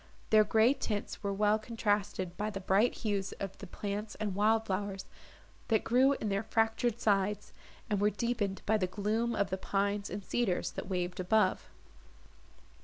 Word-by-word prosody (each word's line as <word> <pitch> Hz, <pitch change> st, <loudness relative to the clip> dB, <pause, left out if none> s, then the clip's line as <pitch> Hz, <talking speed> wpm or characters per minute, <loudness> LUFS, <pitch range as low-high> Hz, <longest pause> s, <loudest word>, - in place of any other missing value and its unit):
Their 215 Hz, -1 st, +7 dB
grey 220 Hz, +4 st, +4 dB
tints 215 Hz, -7 st, -4 dB
were 200 Hz, -1 st, -1 dB
well 210 Hz, +2 st, +2 dB
contrasted 205 Hz, -5 st, -1 dB
by 210 Hz, +2 st, -2 dB
the 200 Hz, -2 st, -5 dB
bright 195 Hz, +5 st, +2 dB
hues 200 Hz, -3 st, -2 dB
of 195 Hz, -1 st, -6 dB
the -, -, -8 dB
plants 205 Hz, +3 st, -4 dB
and 210 Hz, -2 st, -3 dB
wild 220 Hz, +3 st, +2 dB
flowers, 195 Hz, -1 st, -3 dB, 0.6 s
that 220 Hz, -2 st, +2 dB
grew 260 Hz, +4 st, +4 dB
in 220 Hz, -, -3 dB
their 195 Hz, 0 st, 0 dB
fractured 225 Hz, +1 st, 0 dB
sides, 205 Hz, -1 st, 0 dB, 0.3 s
and 205 Hz, -3 st, 0 dB
were 205 Hz, -, +4 dB
deepened 210 Hz, -3 st, -2 dB
by 220 Hz, +1 st, +3 dB
the 185 Hz, -3 st, 0 dB
gloom 215 Hz, +5 st, -1 dB
of 200 Hz, -2 st, 0 dB
the 190 Hz, -, -2 dB
pines 200 Hz, +1 st, -1 dB
and 200 Hz, -1 st, -6 dB
cedars, 225 Hz, -7 st, 0 dB
that -, -, -6 dB
waved 180 Hz, -1 st, -2 dB
above. 185 Hz, +1 st, +2 dB
205 Hz, 170 wpm, -32 LUFS, 195-220 Hz, 0.6 s, Their